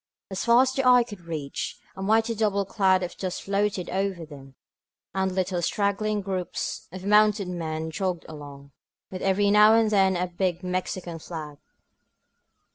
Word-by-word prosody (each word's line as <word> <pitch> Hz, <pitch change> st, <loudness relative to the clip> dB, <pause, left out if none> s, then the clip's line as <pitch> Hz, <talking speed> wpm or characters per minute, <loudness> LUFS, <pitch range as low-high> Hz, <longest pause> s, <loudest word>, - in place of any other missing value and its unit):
As 190 Hz, -, -3 dB
far 235 Hz, +2 st, +6 dB
as 260 Hz, -, 0 dB
the 270 Hz, -, 0 dB
eye 250 Hz, -1 st, +6 dB
could 205 Hz, -7 st, -12 dB
reach, 150 Hz, -4 st, -4 dB, 0.2 s
a 190 Hz, -, -8 dB
mighty 220 Hz, +3 st, +2 dB
double 205 Hz, -2 st, 0 dB
cloud 190 Hz, -2 st, +2 dB
of 175 Hz, -, -5 dB
dust 185 Hz, -2 st, -4 dB
floated 200 Hz, -2 st, -1 dB
over 190 Hz, -3 st, -2 dB
them; 135 Hz, -3 st, -13 dB, 0.6 s
and 190 Hz, 0 st, 0 dB
little 185 Hz, -1 st, -1 dB
straggling 205 Hz, +3 st, 0 dB
groups 190 Hz, -2 st, -4 dB
of 185 Hz, +1 st, -8 dB
mounted 210 Hz, -1 st, +4 dB
men 160 Hz, -2 st, -4 dB
jogged 185 Hz, -1 st, -2 dB
along, 140 Hz, -2 st, -11 dB, 0.4 s
with 185 Hz, -, -6 dB
every 200 Hz, +1 st, +2 dB
now 210 Hz, +1 st, +7 dB
and 225 Hz, -1 st, +3 dB
then 190 Hz, -2 st, +3 dB
a 180 Hz, -, 0 dB
big 180 Hz, 0 st, -2 dB
Mexican 180 Hz, -2 st, -3 dB
flag. 155 Hz, -3 st, -8 dB
190 Hz, 160 wpm, -26 LUFS, 175-205 Hz, 0.6 s, now